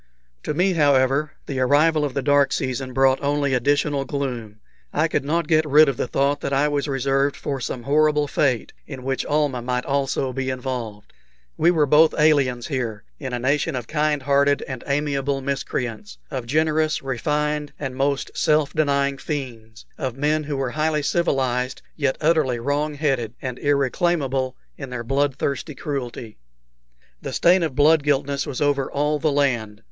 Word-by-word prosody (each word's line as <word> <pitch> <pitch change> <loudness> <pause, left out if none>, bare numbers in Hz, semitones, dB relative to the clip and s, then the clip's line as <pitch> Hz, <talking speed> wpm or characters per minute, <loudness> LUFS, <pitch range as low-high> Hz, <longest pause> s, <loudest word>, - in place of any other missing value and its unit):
To 150 - -3
me, 185 +3 +2
however, 145 -1 +2
the 135 -2 -4
arrival 150 +4 +3
of 145 -3 -3
the 140 - -1
dark 145 0 +3
season 130 0 -2
brought 135 +1 +3
only 140 -1 0
additional 145 +2 +1
gloom. 125 -7 -4 0.3
I 155 +2 +1
could 150 - -1
not 160 +3 -1
get 155 0 +3
rid 150 +1 +6
of 135 - 0
the - - -1
thought 140 +3 0
that 140 - -3
I 140 +2 +2
was 145 0 -1
reserved 135 +1 0
for 140 -2 -4
some 120 0 -4
horrible 150 +2 +2
fate, 130 -5 0
in 135 -3 -8
which 135 0 -1
Almah 145 -4 0
might 125 +1 -2
also 135 -1 -1
be 130 +1 -2
involved. 125 -5 -5 0.4
We 165 - +3
were 160 -4 +3
both 150 +3 +5
aliens 140 -6 +3
here, 120 -7 -3 0.2
in 130 -3 -5
a 125 - -2
nation 140 +5 0
of 125 -2 -4
kind 150 -2 0
hearted 140 +1 +2
and 130 -3 -6
amiable 140 -1 0
miscreants 125 - -4
of 125 -3 -4
generous, 155 +2 +1
refined, 150 +3 -1
and 135 -3 -5
most 140 +1 -1
self 150 -2 +2
denying 140 -2 +1
fiends; 115 -7 -6
of 130 -2 -3
men 150 +2 0
who 145 -1 -3
were 135 -2 -2
highly 155 0 0
civilized, 130 -6 0
yet 140 -4 0
utterly 155 -6 +2
wrong 145 +5 -1
headed 135 -6 -1
and 125 -2 -5
irreclaimable 140 -2 0 0.2
in 135 - -6
their 125 -2 -5
blood 135 +2 0
thirsty 140 +2 -3
cruelty. 125 - -5 0.8
The - - -5
stain 180 +2 +4
of 155 -6 -2
blood 150 +2 +5
guiltiness 140 -1 0
was 135 - -4
over 140 -2 +1
all 150 +1 0
the 155 0 +1
land. 120 -7 0
140 Hz, 170 wpm, -22 LUFS, 130-150 Hz, 0.8 s, rid